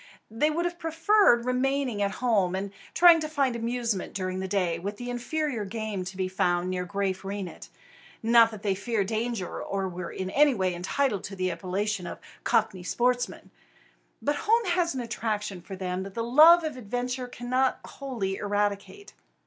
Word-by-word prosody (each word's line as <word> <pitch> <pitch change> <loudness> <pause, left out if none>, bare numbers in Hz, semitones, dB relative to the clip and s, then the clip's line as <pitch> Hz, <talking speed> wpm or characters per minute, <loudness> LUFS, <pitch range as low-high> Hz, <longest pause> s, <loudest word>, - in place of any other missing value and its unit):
They 265 +8 +2
would 335 +3 -1
have 345 0 -3
preferred 325 - +3
remaining 255 -2 0
at 200 -1 0
home 195 -6 +2
and 195 +1 -3 0.2
trying 345 -1 +8
to 310 -1 -3
find 275 -5 +1
amusement 235 -3 -2
during 185 -1 -2
the 190 - -3
day 180 -4 0
with 200 +4 -5
the 245 +1 -5
inferior 250 0 -2
game 210 -1 -4
to 185 +1 -7
be 185 -1 0
found 180 -1 0
near 180 -1 -2
Graaf 195 0 -2
Reinet, 195 -2 -6 0.5
not 230 0 +6
that 215 -3 -10
they 200 -2 +2
fear 210 +2 -1
danger 220 -1 -3
or 195 -1 -2
were 180 -1 -6
in 190 0 -4
any 290 +1 +4
way 185 -3 0
entitled 200 +5 -1
to 195 - -7
the 185 -1 -1
appellation 185 +2 -2
of - - -6 0.3
"cockney 215 -4 +1
sportsmen"; 245 +6 -1 0.7
but 290 0 +1
home 455 +2 +2
has 345 -3 +1
an 255 - -2
attraction 215 -5 -3
for 190 +2 -8
them 185 0 -3
that 195 0 -8
the 230 - -1
love 315 +8 +7
of 305 -4 -4
adventure 250 +2 -3
cannot 255 +2 0
wholly 230 -9 -4
eradicate. 205 - -2
220 Hz, 175 wpm, -27 LUFS, 190-255 Hz, 0.7 s, trying